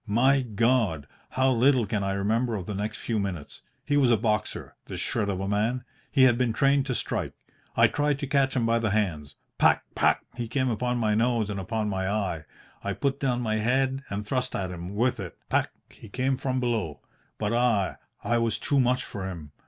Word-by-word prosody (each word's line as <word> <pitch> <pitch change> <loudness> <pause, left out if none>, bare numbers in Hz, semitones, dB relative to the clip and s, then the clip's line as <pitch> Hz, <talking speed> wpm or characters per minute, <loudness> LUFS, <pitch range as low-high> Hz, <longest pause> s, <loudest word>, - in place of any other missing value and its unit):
My 130 +6 +4
God! 115 - +1 0.2
how 130 0 +2
little 125 0 +4
can 105 0 -1
I 95 0 0
remember 110 +4 0
of 95 -4 -4
the 105 - -4
next 105 +3 -3
few 115 -2 -2
minutes! 90 -7 -5 0.2
He 145 - +2
was 135 -4 +4
a 115 - +5
boxer, 105 -1 -2
this - - -5
shred 100 - -1
of 95 -2 -2
a 95 - -2
man. 110 +5 0 0.3
He 135 - +4
had 120 -2 +5
been 120 -3 +1
trained 140 +2 +3
to 130 - -1
strike. - - -2 0.4
I - - +7
tried 145 -1 +1
to 140 - -3
catch 135 -1 +1
him 120 -3 +1
by 115 0 +2
the 110 -1 0
hands. 85 -9 -1 0.2
Pac, - - +4
pac, - - +3
he 120 -1 -4
came 130 +2 0
upon 125 +2 -1
my 110 -3 +1
nose 115 -1 +1
and 100 - -3
upon 110 +3 -2
my 95 -2 -1
eye. 95 -7 -2 0.4
I - - -1
put 140 0 -1
down 125 -3 0
my 110 -2 0
head 130 +4 +1
and 100 +1 -4
thrust 130 +3 -1
at 95 -2 -2
him 90 +3 -7
with 120 +2 +1
it. 90 -3 -7
Pac, - - +2 0.2
he 110 - -13
came 130 +5 0
from 130 0 -1
below. 115 - -2 0.4
But 105 +1 -1
ah! 120 -5 +2 0.3
I 120 0 +1
was 115 -2 0
too 140 - +1
much 125 0 +2
for 95 -2 -5
him. 80 -5 -8
115 Hz, 215 wpm, -27 LUFS, 100-130 Hz, 0.4 s, I